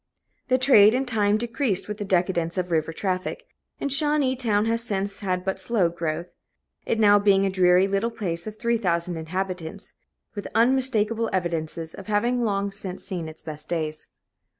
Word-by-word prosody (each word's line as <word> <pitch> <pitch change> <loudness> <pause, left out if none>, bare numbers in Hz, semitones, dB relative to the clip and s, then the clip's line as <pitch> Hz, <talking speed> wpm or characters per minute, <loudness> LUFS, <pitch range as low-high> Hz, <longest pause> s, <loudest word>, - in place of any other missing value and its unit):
The 255 - +3
trade, 245 -4 +6
in 265 +1 0
time, 210 -4 +2
decreased 235 -3 -1
with 210 0 -5
the 205 - -3
decadence 175 -2 0
of 180 -1 -2
river 160 -1 +1
traffic; 185 - -3 0.4
and 280 - -2
Shawneetown 260 -7 +2
has 230 +1 0
since 200 -2 -2
had 185 -3 -2
but 190 0 -2
slow 190 -4 +1
growth 170 0 -4 0.6
it 225 - 0
now 205 -1 +6
being 200 -1 +4
a 195 - 0
dreary 185 0 +4
little 200 +4 0
place 185 -6 -4
of 215 0 -7
three 235 0 0
thousand 175 -3 0
inhabitants, 175 0 -5 0.4
with 205 - -5
unmistakable 230 -2 +2
evidences 165 -3 -3
of 195 - -10
having 235 +4 +1
long 200 -2 0
since 195 -2 -4
seen 170 -4 -5
its 155 - -10
best 155 -1 -7
days. 155 -2 -3
195 Hz, 170 wpm, -24 LUFS, 175-230 Hz, 0.6 s, trade